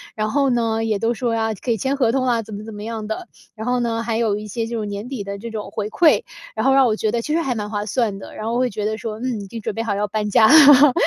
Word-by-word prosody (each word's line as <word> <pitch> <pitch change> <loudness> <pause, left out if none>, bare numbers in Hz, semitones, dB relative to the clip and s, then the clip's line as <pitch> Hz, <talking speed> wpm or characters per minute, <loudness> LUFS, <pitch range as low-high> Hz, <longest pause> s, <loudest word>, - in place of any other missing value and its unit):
然 215 0 -1
后 275 +3 +2
呢， 225 -2 0
也 215 -3 0
都 230 +2 +1
说 235 +1 -1
呀， 225 -1 0
可 235 +5 -3
以 225 - +1
签 265 +6 -1
合 245 -5 +2
同 260 +1 0
啊， 240 -2 +1
怎 215 0 -10
么 205 +1 -6
怎 220 - -9
么 205 - -7
样 220 -1 -5
的。 220 - -5 0.3
然 220 0 -6
后 250 0 +1
呢 230 -1 -1
还 225 -1 -1
有 220 -3 +1
一 210 0 -7
些 225 +2 -3
就 235 -1 -3
是 - - -3
年 205 +2 -5
底 255 -7 -4
的 200 0 -6
这 230 +2 -7
种 220 -2 -6
回 210 0 -3
馈， 325 +2 +4 0.3
然 220 - -1
后 270 - +5
让 270 -1 +5
我 220 -3 +2
觉 215 -1 -1
得 235 - 0
其 300 - -3
实 335 - +2
还 265 -6 -1
蛮 210 -2 -3
划 205 -1 -2
算 215 -2 -1
的， - - -11
然 215 - -6
后 230 +1 -1
会 255 - +1
觉 210 -1 -4
得 220 0 -1
说： 215 -1 -6
“嗯， 245 -5 -2
已 200 - -8
经 230 +3 -7
准 205 - -3
备 225 - -3
好 210 -3 -1
要 210 +1 -1
搬 210 +1 -2
家 220 +2 +5
了。” 290 -1 +8
225 Hz, 345 characters per minute, -21 LUFS, 215-245 Hz, 0.3 s, 了